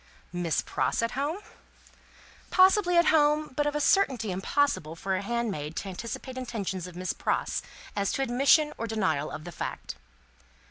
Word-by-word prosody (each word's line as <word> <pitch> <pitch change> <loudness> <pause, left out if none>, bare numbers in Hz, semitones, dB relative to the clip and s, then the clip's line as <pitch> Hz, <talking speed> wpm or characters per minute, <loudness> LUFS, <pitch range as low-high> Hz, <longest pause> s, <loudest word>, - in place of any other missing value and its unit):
"Miss 175 -2 0
Pross - - 0
at 230 - 0
home?" 295 +9 -2 1.1
Possibly 370 -1 +5
at 340 - +5
home, 300 -1 +3
but 295 +1 +1
of 295 - -1
a - - +1
certainty 270 - +2
impossible 185 - 0
for 190 +3 -2
handmaid 200 -8 -3
to 195 - -4
anticipate 235 +6 -6
intentions 195 -7 -4
of 180 - -11
Miss 185 +1 -2
Pross, - - -1 0.3
as 200 -1 0
to 270 - 0
admission 275 +4 +4
or 230 - -2
denial 185 -10 0
of 155 - -7
the 175 - -7
fact. - - -6
235 Hz, 155 wpm, -28 LUFS, 185-295 Hz, 1.1 s, Possibly